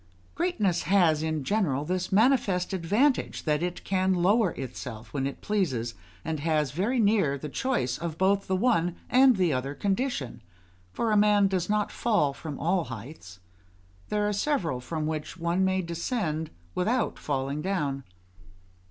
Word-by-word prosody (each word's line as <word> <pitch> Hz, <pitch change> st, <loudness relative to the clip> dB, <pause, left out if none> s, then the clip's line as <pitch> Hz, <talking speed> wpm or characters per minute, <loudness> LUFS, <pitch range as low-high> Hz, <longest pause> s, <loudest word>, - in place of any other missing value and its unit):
Greatness 215 Hz, -, 0 dB
has, 170 Hz, -6 st, +4 dB
in 155 Hz, -2 st, -2 dB
general, 150 Hz, -6 st, 0 dB
this 185 Hz, +2 st, -2 dB
manifest 200 Hz, -4 st, +2 dB
advantage, 210 Hz, -, +1 dB
that 150 Hz, -1 st, +1 dB
it 175 Hz, 0 st, -3 dB
can 190 Hz, 0 st, +1 dB
lower 195 Hz, +4 st, +3 dB
itself 125 Hz, -3 st, -7 dB
when 135 Hz, -2 st, -1 dB
it 140 Hz, -, -7 dB
pleases, 130 Hz, -, -1 dB, 0.3 s
and 160 Hz, -2 st, -2 dB
has, 150 Hz, -3 st, 0 dB
very 200 Hz, -, 0 dB
near, 200 Hz, -10 st, +3 dB
the 150 Hz, -, -6 dB
choice 240 Hz, -, -1 dB
of 165 Hz, -1 st, -4 dB
both 195 Hz, +2 st, +2 dB
the 190 Hz, -, +1 dB
one 180 Hz, -5 st, +2 dB, 0.2 s
and 260 Hz, 0 st, +6 dB
the 180 Hz, -5 st, +2 dB
other 135 Hz, +2 st, -2 dB
condition; 195 Hz, -, -2 dB, 0.5 s
for 230 Hz, -, -1 dB
a -, -, +3 dB
man 205 Hz, -1 st, +5 dB
does 185 Hz, -2 st, -1 dB
not 210 Hz, 0 st, +1 dB
fall 205 Hz, -12 st, +1 dB
from 150 Hz, -1 st, -7 dB
all 175 Hz, +2 st, +1 dB
heights; 115 Hz, -, -9 dB, 0.7 s
there 210 Hz, 0 st, +1 dB
are 210 Hz, -, 0 dB
several 200 Hz, -, 0 dB
from 155 Hz, +5 st, -4 dB
which 155 Hz, +3 st, -4 dB
one 170 Hz, +2 st, 0 dB
may 190 Hz, 0 st, +1 dB
descend 170 Hz, -2 st, -2 dB, 0.2 s
without 230 Hz, +8 st, 0 dB
falling 140 Hz, +1 st, -2 dB
down. 150 Hz, -7 st, -2 dB
175 Hz, 155 wpm, -27 LUFS, 150-205 Hz, 0.7 s, and